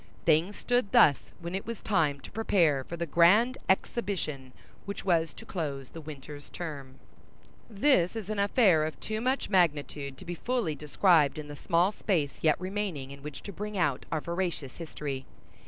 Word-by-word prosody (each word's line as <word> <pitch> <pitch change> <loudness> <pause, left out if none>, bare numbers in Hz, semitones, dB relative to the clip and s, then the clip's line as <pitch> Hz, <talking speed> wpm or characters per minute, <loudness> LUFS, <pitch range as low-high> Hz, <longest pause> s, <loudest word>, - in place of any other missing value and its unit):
Things 165 +5 +3
stood 245 -4 0
thus 145 - +5
when 170 +1 -5
it 195 +3 -4
was 230 -1 -6
time 155 -9 +1
to - - -11
prepare 170 -10 +2
for 170 - -7
the 170 - -2
grand 200 - +4
exhibition 185 - -1 0.3
which 200 -1 -6
was 165 -4 +2
to - - -11
close 140 -7 -4
the 165 - -9
winter's 145 -1 -9
term. 145 -6 -7 0.7
This 215 -4 +3
is 220 -4 -5
an 215 -1 -3
affair 200 -6 +4
of 155 0 -4
too 215 0 -3
much 260 +3 0
magnitude 145 -6 +1
to - - -11
be 175 - -4
fully 230 -2 -1
described 150 0 +3
in 150 -1 -7
the 145 - -7
small 170 +5 +2
space 165 -10 0
yet 155 -1 +3
remaining 185 -8 -3
in 140 0 -10
which 150 +1 -8
to 200 - -7
bring 210 +2 -5
out 145 -8 0
our 155 - 0
veracious 170 -6 -3
history. 145 -5 -5
170 Hz, 175 wpm, -29 LUFS, 145-200 Hz, 0.7 s, thus